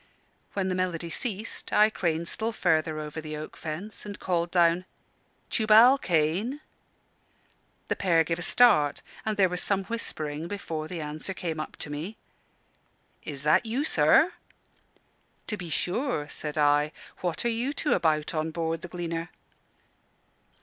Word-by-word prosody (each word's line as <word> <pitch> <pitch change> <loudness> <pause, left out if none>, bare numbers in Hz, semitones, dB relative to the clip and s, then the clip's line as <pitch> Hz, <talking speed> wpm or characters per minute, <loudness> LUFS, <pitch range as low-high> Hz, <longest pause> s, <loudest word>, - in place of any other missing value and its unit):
When 195 -2 0
the 185 - 0
melody 175 -2 -2
ceased, 215 +3 -4
I 215 +1 +5
craned 170 -4 -1
still 225 +5 -2
further 160 -6 +1
over 155 +1 -5
the 155 -1 -6
oak 155 - -7
fence 175 +7 -6
and 205 -1 -7
called 175 -2 0
down, 170 0 +3 0.7
"Tubal 225 +5 +6
Cain!" 180 - +1 1.3
The - - 0
pair 170 -4 +3
gave 165 +1 -2
a - - -4
start, 175 -7 +4 0.2
and 215 -1 0
there 195 -2 +5
was 180 0 -3
some 195 -1 +1
whispering 160 -8 -4
before 165 -6 -4
the 170 -1 -5
answer 155 +5 -4
came 165 -4 -3
up 155 - -5
to 150 - -6
me. 165 +9 -5 1.1
"Is 140 -2 -5
that 155 +9 +4
you, 245 +6 0
sir?" - - +4 1.1
"To 210 - -2
be 180 -4 -7
sure," 180 - -1
said 150 0 -5
I. 145 0 +3 0.3
"What 175 +4 -2
are - - +3
you 235 +4 -1
two 295 +1 0
about 155 -1 +1
on 155 0 -1
board 165 0 -2
_The 175 - -8
Gleaner? 170 -1 -4
170 Hz, 150 wpm, -27 LUFS, 155-205 Hz, 1.3 s, Tubal